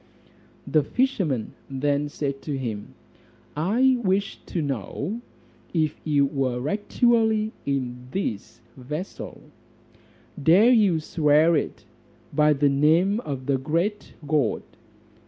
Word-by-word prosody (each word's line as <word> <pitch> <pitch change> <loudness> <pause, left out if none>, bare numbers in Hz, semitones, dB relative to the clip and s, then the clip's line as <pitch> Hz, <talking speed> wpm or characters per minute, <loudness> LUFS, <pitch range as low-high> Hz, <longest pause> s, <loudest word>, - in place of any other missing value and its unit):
The 155 - +3
fisherman 175 - -1 0.2
then 145 +2 0
said 140 -2 -4
to 145 -3 -3
him, 110 -6 -5 0.6
"I 235 - +3
wish 195 +1 0
to 175 - -3
know 145 - -3 0.5
if 155 -2 0
you 145 -3 +3
were 135 -2 -1
actually 220 - +2 0.2
in 125 -3 -2
this 115 - -4
vessel: 150 +8 -7 1.0
Dare 185 - +6
you 205 -9 +4
swear 155 +1 +3
it 150 - -3 0.5
by 150 0 +4
the 145 0 +3
name 160 +9 +3
of 135 - -5
the 135 -1 +1
great 170 +9 -2
God?" 145 -6 +1
150 Hz, 110 wpm, -25 LUFS, 135-195 Hz, 1.0 s, Dare